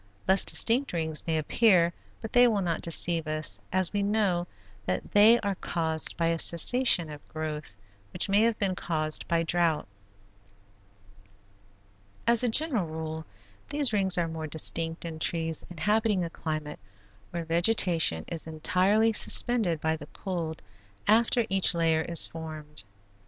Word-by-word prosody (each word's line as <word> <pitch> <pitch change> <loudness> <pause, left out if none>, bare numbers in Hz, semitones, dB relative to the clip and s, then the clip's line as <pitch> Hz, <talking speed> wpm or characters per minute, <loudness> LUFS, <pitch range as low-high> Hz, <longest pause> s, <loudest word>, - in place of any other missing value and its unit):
Less 190 +1 +5
distinct 250 +2 +2
rings 160 -2 -2
may 160 -1 0
appear 175 +1 +2 0.3
but 220 - -8
they 245 0 +6
will 210 -4 0
not 170 -2 -2
deceive 165 -1 +1
us 155 -10 -3
as 185 0 0
we 205 - -1
know 200 -4 0 0.4
that 90 0 -3
they 215 +3 +6
are 200 -1 -2
caused 160 -3 -1
by 170 - 0
a 165 0 0
cessation 175 +1 +3
of 145 -1 -12
growth, 155 -7 -6 0.4
which - - -2
may 200 +1 +2
have 230 -1 +1
been 195 -2 -1
caused 155 -4 -3
by 165 0 0
drouth. 165 -2 0 2.4
As 235 0 +5
a 245 - +2
general 240 - +1
rule 160 0 -6 0.4
these 285 -5 0
rings 190 -3 +2
are 170 -1 0
more 160 -1 -6
distinct 165 +2 +1
in 160 -1 -7
trees 165 0 0
inhabiting 210 +3 0
a 165 - -5
climate 155 -3 -6 0.5
where 170 -1 -5
vegetation 170 - +2
is 165 -1 -5
entirely 190 +8 +1
suspended 215 -7 +1
by 160 +1 -1
the 160 - -11
cold 170 -5 -6 0.4
after 230 +2 +3
each 190 -3 +2
layer 165 -1 +1
is 170 +1 +2
formed. 155 -2 -8
170 Hz, 145 wpm, -27 LUFS, 160-205 Hz, 2.4 s, they